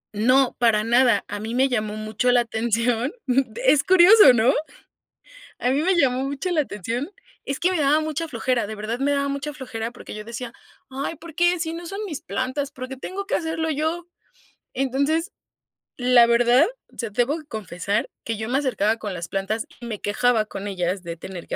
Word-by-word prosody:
No, 255 +5 +3
para 220 -3 +3
nada, 240 -1 +3
a 205 0 -5
mí 225 +2 -5
me 265 +1 +4
llamó 215 -4 -2
mucho 215 +3 0
la 245 - +5
atención, 230 +2 0 0.5
es 265 +3 +3
curioso, 375 - +8
¿no?, 245 +3 +3 1.1
a 250 - 0
mí 275 +3 +2
me 370 +2 +2
llamó 265 -4 +2
mucho 280 +6 -3
la 330 -3 +2
atención, 240 - -4 0.4
es 275 - -3
que 360 +2 +2
me 350 - 0
daba 295 +2 +3
mucha 315 +1 -3
flojera, 235 -3 -1
de 220 - -6
verdad 215 +3 -4
me 285 +1 +1
daba 280 0 0
mucha 280 +1 -4
flojera 235 -5 -5
porque 245 - -10
yo 210 - -6
decía: 235 +1 -7 0.4
"Ay, 275 +5 -4
¿por 325 0 -12
qué 350 +1 +3
si 320 0 -2
no 340 +1 -7
son 395 +4 -5
mis 320 -9 -5
plantas? 260 +2 -3
¿Por 255 -1 -7
qué 265 - -7
tengo 395 +7 -5
que - - +1
hacerlo 320 -1 -2
yo?" 320 +4 -2 0.7
Entonces, 280 - 0 0.7
la 245 -1 +6
verdad, 240 +4 +5 0.3
o - - -20
sea, 230 - -2
debo 245 +9 0
confesar 205 - -3 0.2
que 225 -2 -3
yo 220 +1 -4
me 265 +2 +2
acercaba 225 -5 0
con 205 -4 -5
las 170 -1 -5
plantas 195 +3 -2 0.2
y 240 - -7
me 215 -3 -5
quejaba 220 +1 +1
con 205 -1 -7
ellas 185 0 -2
de 170 -2 -7
tener 180 0 -9
que - - -3
250 Hz, 200 wpm, -23 LUFS, 220-295 Hz, 1.1 s, curioso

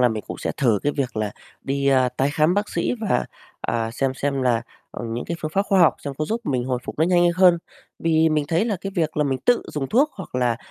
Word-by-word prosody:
là 125 - +5
mình 110 -2 -3
cũng - - -6
sẽ - - -2
thử 115 -7 +3
cái 145 - +1
việc 130 -5 -2
là 105 -1 -1 0.3
đi, 140 0 -1
a, 130 -2 +4
tái 130 +3 0
khám 155 +4 +2
bác 205 +1 0
sĩ - - -1
và, 215 - +1 0.4
à, 115 -1 -1
xem 130 +2 -1
xem 140 -1 -1
là, 120 -2 +2 0.3
ừm, 115 -1 -5
những 120 - -3
cái 170 - -4
phương 155 - -3
pháp 195 - +3
khoa 195 -2 +3
học 170 - +6
xem 140 -1 -4
có 155 - 0
giúp 225 +9 -2
mình 125 - 0
hồi 125 -1 -1
phục - - -7
nó 160 - +4
nhanh 175 0 +4
hơn. 180 -2 +6 0.4
Vì 160 -1 +3
mình 150 -1 +1
thấy 170 +5 +2
là 215 -4 -1
cái 195 0 -5
việc 160 -3 -1
là 150 - +2
mình 135 -2 -1
tự 245 -1 +3
dùng 140 -3 -3
thuốc, 280 +7 +3
hoặc 190 -9 -10
là 125 -2 +1
145 Hz, 270 wpm, -23 LUFS, 125-175 Hz, 0.4 s, học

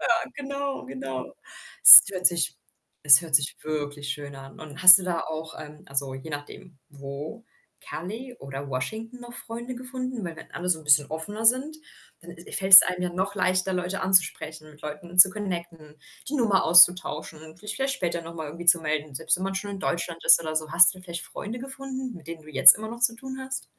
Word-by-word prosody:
Ja, - - -4 0.3
genau, 280 - -7
genau. 130 0 -9 0.5
Es - - +12
hört 185 -1 +1
sich 170 -2 -1 0.5
es 140 0 +7
hört 160 -3 -8
sich 145 -1 +1
wirklich 145 -2 -7
schön 140 0 -8
an 135 +2 -15
und 155 +1 -12
hast 185 +1 +10
du - - -8
da 175 -2 -4
auch 160 0 -9
ähm, 150 0 -13
also 135 -1 -4
je 135 +4 -11
nachdem, 145 +2 -11
wo, 145 +10 -11 0.4
Cali 225 +9 -10
oder 135 +1 -10
Washington 220 - -7
noch 240 0 -13
Freunde 240 +2 -9
gefunden? 255 -3 -8
Weil 170 -1 -8
wenn - - -15
alle 180 +1 -7
so 170 -3 0
'n - - -20
bisschen 145 -1 +2
offener 205 +8 -5
sind, 265 +6 +1 0.4
dann 175 +1 -14
is 170 0 -10
fällt's 190 -1 +9
einem 180 0 -5
ja 180 - -3
noch 190 +3 -5
leichter, 185 0 -2
Leute 180 +1 -5
anzusprechen, 160 -4 0
mit 150 - -22
Leuten 155 +4 -10
zu 185 +1 +9
connecten, 170 -6 -9 0.3
die 295 - -7
Nummer 215 -8 0
auszutauschen 170 -2 +3
und 160 +1 -16
sich 210 - -8
vielleicht 270 +1 -3
später 170 -5 -5
noch 165 0 -12
mal 160 -2 -8
irgendwie 170 +4 -11
zu 170 -1 +5
melden, 150 -2 -5
selbst 130 - -1
wenn 185 - -7
man 195 - -5
schon 200 +1 -6
in 195 - -9
Deutschland 170 -1 -5
ist - - +6
oder 155 -1 -7
so. 155 -1 -4
Hast 170 0 +6
du 185 - -16
vielleicht 175 -2 -9
Freunde 225 +4 -9
gefunden, 265 -1 -9
mit 165 -3 -17
denen 165 -1 -10
du 155 - -19
jetzt 135 -2 +8
immer 220 +1 -9
noch 235 +1 -11
zu 240 -1 +1
tun 265 +1 -10
hast? 265 0 -7
175 Hz, 210 wpm, -23 LUFS, 155-210 Hz, 0.5 s, Es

